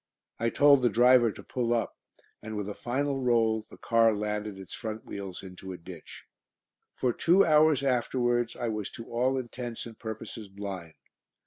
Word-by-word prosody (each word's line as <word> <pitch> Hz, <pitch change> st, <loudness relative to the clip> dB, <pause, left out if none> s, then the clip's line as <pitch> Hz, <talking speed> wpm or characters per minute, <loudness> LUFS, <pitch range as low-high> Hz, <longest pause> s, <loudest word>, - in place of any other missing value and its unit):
I 115 Hz, -, +1 dB
told 140 Hz, +1 st, +5 dB
the 120 Hz, -, +4 dB
driver 120 Hz, 0 st, +5 dB
to -, -, -11 dB
pull 120 Hz, -2 st, -1 dB
up, 115 Hz, -, -1 dB, 0.5 s
and 110 Hz, 0 st, -6 dB
with 105 Hz, -1 st, -3 dB
a 105 Hz, -, -4 dB
final 135 Hz, +5 st, -2 dB
roll 115 Hz, -3 st, +2 dB
the -, -, -13 dB
car 115 Hz, -1 st, +3 dB
landed 105 Hz, -1 st, -3 dB
its 95 Hz, -2 st, -10 dB
front 110 Hz, -1 st, -5 dB
wheels 100 Hz, -3 st, -7 dB
into 95 Hz, 0 st, -8 dB
a -, -, -8 dB
ditch. 85 Hz, -1 st, -11 dB, 0.7 s
For 125 Hz, -2 st, 0 dB
two 180 Hz, +9 st, +4 dB
hours 155 Hz, -3 st, +4 dB
afterwards 120 Hz, -2 st, +1 dB
I 120 Hz, -, -3 dB
was 105 Hz, -2 st, -3 dB
to 115 Hz, -, -8 dB
all 125 Hz, +3 st, +1 dB
intents 120 Hz, -2 st, -5 dB
and 115 Hz, -2 st, -11 dB
purposes 110 Hz, -1 st, -7 dB
blind. 95 Hz, -4 st, -7 dB
115 Hz, 175 wpm, -29 LUFS, 105-125 Hz, 0.7 s, told